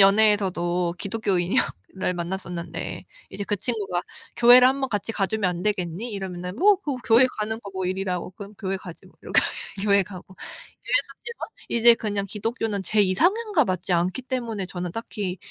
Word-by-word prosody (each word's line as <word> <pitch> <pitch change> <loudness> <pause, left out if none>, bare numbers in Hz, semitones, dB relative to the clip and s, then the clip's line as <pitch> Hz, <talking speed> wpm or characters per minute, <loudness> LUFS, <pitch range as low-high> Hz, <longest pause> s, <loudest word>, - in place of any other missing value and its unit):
연애에서도 190 -4 +3
기독교인이여 195 -4 +1 0.3
를 185 -1 -1
만났었는데 175 -1 -5 0.3
이제 200 - -5
그 205 - -1
친구가 200 -5 -2 0.4
"교회를 245 +1 +8
한번 265 0 0
같이 210 +2 -2
가 195 -3 +1
주면 210 -4 0
안 175 0 -5
되겠니?" 200 +2 -2
이러면은 180 -1 -5
"뭐 405 +1 +6
그거 295 -9 -4
교회 235 +3 +6
가는 220 +2 -2
거 200 - -9
뭐 190 -1 -3
일이라고 185 -1 -2
그럼 200 +2 -10
교회 195 -2 -2
가지 175 -2 -11
뭐." - - -20
이렇게 - - +3 0.4
교회 200 -1 +5
가고 185 0 -11 0.5
이랬었지만 480 -1 -1 0.2
이제 235 0 +7
그냥 205 -3 -2
기독교는 215 0 -2
제 210 +3 +3
이상향과 350 - +2
맞지 185 0 -1
않기 180 +8 0
때문에 235 -6 -3
저는 180 -1 -5
딱히. 205 -5 -4
200 Hz, 375 characters per minute, -25 LUFS, 180-225 Hz, 0.5 s, 교회를